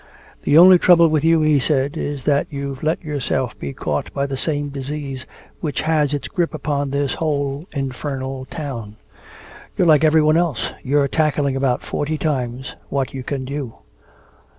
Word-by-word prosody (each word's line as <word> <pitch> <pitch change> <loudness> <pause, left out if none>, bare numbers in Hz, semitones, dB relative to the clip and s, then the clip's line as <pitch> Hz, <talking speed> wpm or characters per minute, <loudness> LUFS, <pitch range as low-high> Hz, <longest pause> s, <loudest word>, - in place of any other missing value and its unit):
"The 145 - +3
only 180 +1 +9
trouble 170 -2 +6
with 155 -1 +1
you," 165 0 +4
he 155 -2 +4
said, 140 0 0
"is 145 -2 -4
that 145 -1 +2
you've 140 -2 -5
let 160 +3 -1
yourself 130 -4 -2
be 70 - -4
caught 75 +2 -3
by 140 0 0
the 135 -1 -3
same 145 +1 -2
disease 140 -1 -5 0.3
which 150 -3 -2
has 155 -2 +1
its 145 -2 -2
grip 170 -3 -1
upon 145 -1 -2
this 140 0 -1
whole 145 0 -2
infernal 135 -1 -4
town. 130 -10 -6 0.8
You're - - +3
like 155 -2 +5
everyone 155 0 +4
else, 155 -10 0
you're 140 +1 +2
tackling 145 -2 +1
about 135 -2 0
forty 155 +2 -2
times 130 -4 -3
what 135 -2 -2
you 135 - -5
can 135 0 -4
do. 135 -3 -5
145 Hz, 165 wpm, -20 LUFS, 135-155 Hz, 0.8 s, only